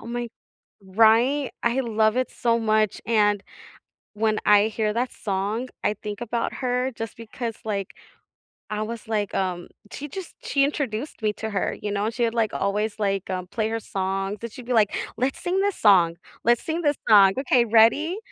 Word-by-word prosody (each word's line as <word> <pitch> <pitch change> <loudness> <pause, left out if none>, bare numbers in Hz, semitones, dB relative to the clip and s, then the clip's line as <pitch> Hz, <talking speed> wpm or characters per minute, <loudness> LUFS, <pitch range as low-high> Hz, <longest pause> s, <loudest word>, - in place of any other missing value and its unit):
oh, - - -12
my 240 0 -3 0.6
Right? 230 +8 +3
I 240 +2 +1
love 220 -2 +1
it 255 0 0
so 235 -1 +1
much, 215 -2 +1
and 205 -3 +2 0.7
when 215 0 +1
I 210 +1 +6
hear 215 -1 -1
that 245 +2 -1
song, 205 +5 -2 0.2
I - - +3
think 210 +1 -7
about 235 0 -2
her 250 0 -1
just 225 -1 -7
because, 230 0 -6
like 200 -3 -2 0.8
I 215 0 -2
was 230 +1 -7
like, 210 -3 -1
um 180 -2 -2 0.2
she 290 - -6
just 360 +5 -8
she 275 - +2
introduced 275 -3 -3
me 215 -1 +1
to 220 +1 -5
her, 195 - -1
you 205 - -3
know? 200 0 -1
And 225 - -2
she 240 +1 -1
had, 230 - +1
like, 225 -3 +1
always, 205 +2 -1
like, 195 -2 -1
um, 185 -1 -3
play 215 +3 -2
her 225 0 -2
songs, 195 +1 -3
and 235 - -5
she'd 250 -1 -10
be 250 - -2
like, 215 -3 +3 0.2
"Let's 255 +3 -1
sing 365 +2 0
this 405 -1 0
song. 175 -5 +5 0.3
Let's 240 0 +3
sing 330 +2 -2
this 290 -2 +2
song. 195 -2 +7
Okay, 250 -3 +3
ready?" 235 - +4
220 Hz, 190 wpm, -24 LUFS, 205-245 Hz, 0.8 s, song